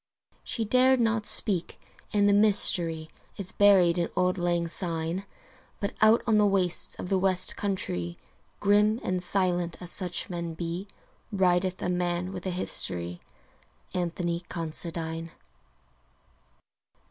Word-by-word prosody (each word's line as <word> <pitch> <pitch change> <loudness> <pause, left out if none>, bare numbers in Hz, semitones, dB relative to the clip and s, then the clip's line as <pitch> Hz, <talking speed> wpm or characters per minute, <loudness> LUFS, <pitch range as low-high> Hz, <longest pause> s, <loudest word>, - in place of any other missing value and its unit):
She 225 - -3
dared 255 +3 +3
not 225 -2 0
speak 190 -6 0 0.3
and 205 -1 +2
the 205 - +3
mystery 175 -6 +4 0.3
Is 195 -3 -1
buried 185 -4 +4
in 170 - 0
auld 180 0 0
lang 175 -1 -1
syne, 165 +1 -3 0.5
But 200 - -3
out 215 +2 +4
on 220 -3 +2
the 210 - +3
wastes 185 -3 +2
of 180 - -7
the 195 - +1
West 185 -1 +5
countrie, 90 - -4 0.4
Grim 210 +2 +2
and 185 -1 -2
silent 180 -2 -1
as 180 -1 0
such 180 -2 +1
men 170 -2 -6
be, 170 +4 -5 0.4
Rideth 185 -1 0
a - - -2
man 180 0 -2
with 185 -1 -7
a - - -1
history 90 - -3 0.7
Anthony 175 -1 -3
Considine. 165 0 -4
180 Hz, 130 wpm, -26 LUFS, 170-200 Hz, 0.7 s, West